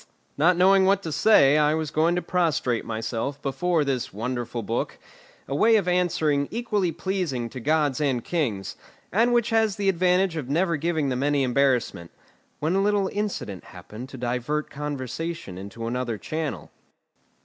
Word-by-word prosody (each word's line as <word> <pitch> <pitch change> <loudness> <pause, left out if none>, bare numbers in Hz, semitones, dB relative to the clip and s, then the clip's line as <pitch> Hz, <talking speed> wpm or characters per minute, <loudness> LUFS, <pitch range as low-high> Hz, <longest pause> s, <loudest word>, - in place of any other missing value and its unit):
not 170 +5 +3
knowing 190 +1 +5
what 195 +1 +2
to 160 - -4
say, 150 -6 +5
I 150 +1 +3
was 160 -2 -3
going 165 +3 +2
to 180 - -1
prostrate 155 -9 0
myself 115 +5 -3
before 160 +3 0
this 130 -3 -2
wonderful 120 +2 -4
book, 115 +4 -3 0.5
a 135 - -4
way 225 +11 +4
of 200 -4 +2
answering 160 -5 +1
equally 210 -6 -1
pleasing 165 -8 -2
to 130 - -7
gods 150 +1 +1
and 130 -5 0
kings, 115 - -2 0.4
and 230 +5 +3
which 240 -1 +2
has 220 -3 +2
the 200 -1 +1
advantage 180 -1 +2
of 135 -5 -5
never 170 +3 +1
giving 155 -1 -1
them 125 0 -1
any 145 -1 +2
embarrassment, 125 -9 +1 0.5
when 155 +4 0
a 195 - +2
little 200 -1 +1
incident 200 - -3
happened 105 +7 -10
to 135 - -9
divert 125 +5 -2
conversation 150 - -5
into 100 +4 -7
another 120 -1 -2
channel. 155 +5 -4
150 Hz, 160 wpm, -25 LUFS, 125-180 Hz, 0.5 s, knowing